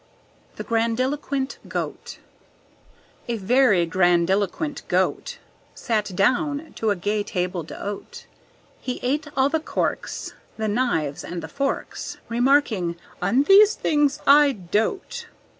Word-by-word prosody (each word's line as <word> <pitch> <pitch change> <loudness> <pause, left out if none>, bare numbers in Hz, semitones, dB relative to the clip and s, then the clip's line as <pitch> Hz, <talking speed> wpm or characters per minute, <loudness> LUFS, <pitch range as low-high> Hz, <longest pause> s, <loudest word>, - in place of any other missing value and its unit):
The - - -6
Grandiloquent 260 +4 -1
Goat - - -5 1.1
A 235 -1 -1
very 210 -3 +3
grandiloquent 190 - +1
Goat 485 -1 0 0.4
Sat 210 -4 -2
down 290 - +1
to 220 - 0
a 205 - +2
gay 205 +3 -1
table 180 -2 -2
d'hôte; 205 - -7 0.5
He 250 -1 -4
ate 290 +4 0
all 265 +1 +4
the 320 +2 0
corks, 310 - -3 0.2
The 220 -1 -1
knives 205 - -1
and 170 0 -6
the - - -5
forks, 275 -1 -3
Remarking: 235 -8 +2 0.3
"On 225 +10 +3
these 405 +5 +7
things 295 -2 +1
I 285 0 +6
dote." 255 - -2
240 Hz, 115 wpm, -23 LUFS, 195-285 Hz, 1.1 s, these